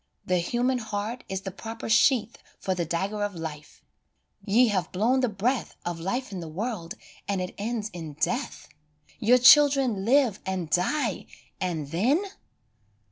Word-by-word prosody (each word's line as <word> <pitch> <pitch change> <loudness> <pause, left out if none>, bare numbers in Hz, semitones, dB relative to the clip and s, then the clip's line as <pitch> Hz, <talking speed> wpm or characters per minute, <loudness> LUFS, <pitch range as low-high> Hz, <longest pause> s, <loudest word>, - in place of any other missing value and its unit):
The 180 -1 +1
human 245 +8 0
heart 220 +2 -4
is 190 0 -3
the 195 - -5
proper 225 +4 -7
sheath 230 0 +3 0.2
For 190 - -2
the 175 -2 -2
dagger 195 +6 -2
of 205 -2 -2
life; 155 -3 -8 0.6
ye 230 +3 +4
have 185 -4 -1
blown 230 +8 +2
the 255 -2 +1
breath 225 +5 -1
Of 175 -1 -3
life 215 +9 -3
in 190 - -5
the 165 - -6
world 180 0 -4 0.3
and 200 -1 -1
it 180 0 -4
ends 220 0 -3
in 160 -4 -7
death; 155 - -2 0.5
Your 240 +4 +5
children 265 -5 +6
live 240 -3 +3
and 180 -5 -3
die, 230 +4 0 0.3
and 160 -6 -3
then 255 - +2
205 Hz, 155 wpm, -26 LUFS, 180-245 Hz, 0.6 s, children